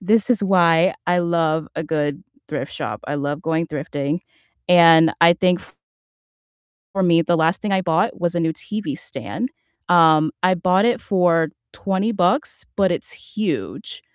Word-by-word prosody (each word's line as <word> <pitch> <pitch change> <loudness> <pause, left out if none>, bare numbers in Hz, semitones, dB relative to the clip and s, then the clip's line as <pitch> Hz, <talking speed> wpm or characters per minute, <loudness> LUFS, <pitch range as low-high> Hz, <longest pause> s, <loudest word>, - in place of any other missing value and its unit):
this 215 +4 +2
is 230 -4 +2
why 175 -2 +3
I 175 0 +2
love 165 -2 0
a 160 - -3
good 150 -1 -2 0.3
thrift - - -5
shop, - - -5
I - - -3
love 145 +1 -3
going 165 0 -1
thrifting, 145 0 -4 0.5
and 165 -2 +6
I 170 0 +7
think 180 0 +1
f - - -14 1.2
for 195 - 0
me, 170 -2 +4
the 170 +1 +1
last 165 +2 +1
thing 210 -2 -3
I 190 - +2
bought 170 -2 -1
was 175 0 -1
a - - +1
new 160 -1 0
TV 215 - -5
stand, 250 +2 -5 0.4
um, 160 -3 +5
I 185 0 +4
bought 185 +2 +2
it 240 +2 +1
for 175 -4 +1 0.2
20 195 +3 -2
bucks, 195 - 0
but 190 -3 +2
it's - - -4 0.2
huge. 365 - -4
175 Hz, 165 wpm, -20 LUFS, 160-190 Hz, 1.2 s, I